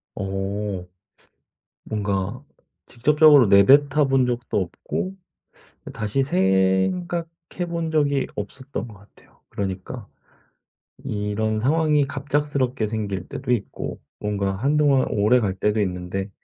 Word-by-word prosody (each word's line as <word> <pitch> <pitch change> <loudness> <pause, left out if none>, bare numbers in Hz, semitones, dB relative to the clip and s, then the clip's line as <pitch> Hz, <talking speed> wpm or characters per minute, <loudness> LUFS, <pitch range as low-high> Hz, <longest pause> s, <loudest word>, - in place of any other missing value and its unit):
어. 95 -1 -3 1.0
뭔가 105 +4 -2 0.4
직접적으로 145 +1 +5
내뱉어 140 +9 +5
본 135 -1 +3
적도 120 -4 -1
없고 185 - -4 0.8
다시 110 +5 0
생각해 95 - +1 0.4
본 170 -1 -3
적이 145 -3 +1
없었던 130 +4 -6
것 110 - -12
같아요. 100 +1 -22
그러니까 100 +4 -5 1.0
이런 105 +1 -1
상황이 150 +2 +2
갑작스럽게 140 -4 -1
생길 100 -4 -4
때도 - - -4
있고 115 -5 -3 0.2
뭔가 100 -2 -1
한동안 140 +3 +2
오래 110 +3 +3
갈 100 -5 -1
때도 105 +3 0
있는데 95 +1 -3
110 Hz, 235 characters per minute, -23 LUFS, 100-140 Hz, 1.0 s, 직접적으로